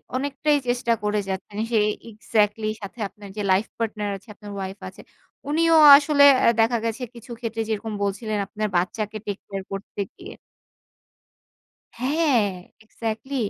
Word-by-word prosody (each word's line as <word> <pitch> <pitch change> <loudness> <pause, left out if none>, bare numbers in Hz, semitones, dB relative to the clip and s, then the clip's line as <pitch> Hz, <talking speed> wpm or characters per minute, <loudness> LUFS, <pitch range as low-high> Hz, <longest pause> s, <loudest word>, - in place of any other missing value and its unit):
অনেকটাই 285 +2 +1
চেষ্টা 245 -1 +1
করে 210 0 +1
যাচ্ছেন। 190 +2 -5
সেই 210 -2 +3 0.2
এক্সাক্টলি 215 0 0
সাথে 200 +4 -9
আপনার 200 +1 -13
যে - - -1
লাইফ 190 +3 +3
পার্টনার 215 -2 -2
আছে 195 - -23
আপনার 205 0 -10
ওয়াইফ 190 0 -5
আছে। - - -14 0.5
উনিও 330 +2 +3 0.2
আসলে 290 0 +3 0.2
আ - - +5
দেখা 230 +2 +2
গেছে 230 +3 -3
কিছু 235 +1 -12
ক্ষেত্রে 225 -1 -3
যেরকম 220 0 -3
বলছিলেন 210 +2 -2
আপনার 215 -1 -3
বাচ্চাকে 210 +4 -2
টেক 205 -1 -3
কেয়ার 195 -1 -5
করতে 195 +1 -5
গিয়ে 375 +3 -10 1.6
হ্যাঁ, 280 +1 +2 0.4
এক্সাক্টলি, 225 +4 -5
220 Hz, 140 wpm, -23 LUFS, 205-250 Hz, 1.6 s, আ